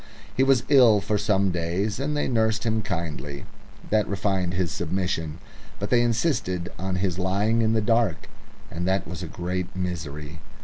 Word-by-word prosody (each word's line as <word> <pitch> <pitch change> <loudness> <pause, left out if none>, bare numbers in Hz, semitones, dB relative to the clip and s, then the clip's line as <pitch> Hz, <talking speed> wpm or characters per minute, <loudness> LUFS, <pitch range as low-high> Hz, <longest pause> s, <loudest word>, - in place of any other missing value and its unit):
He - - +2
was 135 -2 +4
ill 125 -7 +6
for 105 +1 -1
some 100 -2 +2
days, 90 +6 -1
and 150 +2 -1
they - - 0
nursed 110 -2 +1
him 110 -1 +1
kindly. 80 -7 -4 0.5
That 110 -1 +3
refined 95 -3 -1
his 90 -3 0
submission. 85 -3 -2 0.4
But 100 - -4
they 120 -1 +5
insisted 115 - 0
on 95 +1 -2
his 95 -1 -1
lying 100 +5 +2
in 110 0 +2
the 110 - +2
dark, 115 -4 +1 0.4
and 90 +2 -3
that 95 +1 +1
was 90 0 -6
a 90 - -4
great 90 +2 -4
misery. 80 -4 -4
95 Hz, 170 wpm, -25 LUFS, 90-110 Hz, 0.5 s, ill